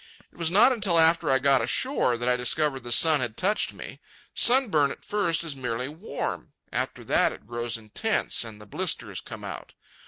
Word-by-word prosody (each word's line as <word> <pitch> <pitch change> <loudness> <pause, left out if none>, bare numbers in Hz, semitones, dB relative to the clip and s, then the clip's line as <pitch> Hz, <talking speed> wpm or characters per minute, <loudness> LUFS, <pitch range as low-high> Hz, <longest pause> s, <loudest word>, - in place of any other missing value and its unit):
It - - -24
was 165 -1 +1
not 210 +9 +5
until 205 -8 +1
after 165 +1 +4
I 135 - +5
got 135 -1 +3
ashore 125 - 0
that 120 +1 -4
I 125 - +3
discovered 135 +3 0
the 120 0 -7
sun 155 +4 +4
had 120 -3 -4
touched 205 +3 0
me. - - -10 0.3
Sunburn 225 - +4
at - - -9
first 200 -6 0
is 160 -4 -5
merely 125 -1 -3
warm; 150 - -5 0.2
after - - -2
that - - +2
it - - -12
grows 120 +1 -3
intense 115 - -1
and 110 -2 -10
the 105 - -12
blisters 100 - -2
come - - -9
out. - - -8
140 Hz, 190 wpm, -26 LUFS, 120-175 Hz, 0.3 s, not